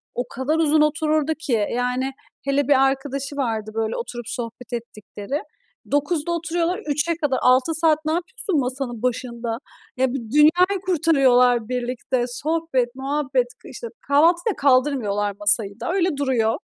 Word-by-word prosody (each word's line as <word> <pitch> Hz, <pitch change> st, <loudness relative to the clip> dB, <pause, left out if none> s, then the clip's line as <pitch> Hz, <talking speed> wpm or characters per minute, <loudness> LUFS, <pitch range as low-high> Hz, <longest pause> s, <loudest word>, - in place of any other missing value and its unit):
o 245 Hz, 0 st, -2 dB
kadar 265 Hz, +5 st, -1 dB
uzun 310 Hz, -1 st, +3 dB
otururdu 305 Hz, 0 st, +1 dB
ki. 235 Hz, -9 st, 0 dB
Yani, 250 Hz, +2 st, -1 dB, 0.3 s
hele 275 Hz, 0 st, +1 dB
bir 270 Hz, -2 st, +5 dB
arkadaşı 275 Hz, +1 st, -3 dB
vardı, 220 Hz, -5 st, -2 dB
böyle, 225 Hz, 0 st, -1 dB
oturup 240 Hz, -, -6 dB
sohbet 240 Hz, +1 st, -6 dB
ettikleri. 225 Hz, +3 st, -5 dB, 0.5 s
09.00'da 290 Hz, +3 st, 0 dB
oturuyorlar, 340 Hz, +1 st, -1 dB
15.00'e 300 Hz, +3 st, 0 dB
kadar. 290 Hz, -5 st, 0 dB
6 255 Hz, +5 st, +4 dB
saat 315 Hz, -1 st, +3 dB
ne 310 Hz, -, +1 dB
yapıyorsun 360 Hz, -, -1 dB
masanın 250 Hz, -3 st, -3 dB
başında? 235 Hz, -2 st, -2 dB, 0.4 s
Eee, 260 Hz, -1 st, +1 dB
bi -, -, -1 dB
dünyayı 350 Hz, +7 st, +4 dB
kurtarıyorlar 260 Hz, -, +3 dB
birlikte. 250 Hz, 0 st, -1 dB
Sohbet, 265 Hz, -2 st, -1 dB
muhabbet, 270 Hz, -2 st, 0 dB, 0.2 s
k -, -, -11 dB
işte, 470 Hz, -, -7 dB, 0.2 s
kahvaltıyı 340 Hz, +8 st, +3 dB
da -, -, -17 dB
kaldırmıyorlar, 255 Hz, -7 st, +2 dB
masayı 205 Hz, 0 st, +1 dB
da, -, -, -2 dB
öyle 360 Hz, -5 st, +1 dB
duruyor. 245 Hz, -5 st, +1 dB
270 Hz, 145 wpm, -22 LUFS, 245-310 Hz, 0.5 s, bir